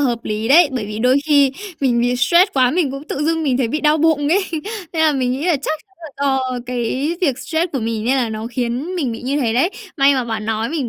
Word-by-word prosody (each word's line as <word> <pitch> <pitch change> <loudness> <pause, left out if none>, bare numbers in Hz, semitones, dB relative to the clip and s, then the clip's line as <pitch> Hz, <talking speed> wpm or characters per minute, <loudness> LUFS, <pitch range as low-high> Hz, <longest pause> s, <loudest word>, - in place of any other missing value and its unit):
hợp 235 -2 -2
lý 215 +2 -3
đấy! 315 +2 +6
Bởi 230 -5 -3
vì 210 +1 -6
đôi 250 +3 +3
khi 285 -3 +4 0.3
mình 245 -3 +2
bị 245 +1 +1
stress 345 - +4
quá 255 -2 +3
mình 320 -5 0
cũng 275 +3 -8
tự 290 - -3
dưng 325 0 0
mình 265 -4 +1
thấy 240 -4 +1
bị 305 +5 -2
đau 305 0 +3
bụng 295 -2 +2
ấy, 380 +4 +2 0.5
nên 320 -1 0
là 310 -1 +4
mình 255 -2 0
nghĩ 275 +5 -3
là 340 -5 +3
chắc 305 +3 -3
chắn 385 - -33
là 315 - -8 0.2
do 260 -2 0
cái 255 +6 -2
việc 275 -8 +1
stress 320 +5 -2
của 270 - -1
mình, 225 -1 -3
nên 260 +3 +2
là 245 -3 0
nó 220 +1 -5
khiến 250 +8 -3
mình 275 -10 -1
bị 225 - -7
như 280 +3 -1
thế 230 -3 0
đấy. 335 +10 +2 0.3
May 275 0 +4
mà 255 -2 -1
bạn 220 -2 -4
nói 220 +1 -1
mình 290 -5 -2
265 Hz, 270 wpm, -19 LUFS, 240-310 Hz, 0.5 s, đấy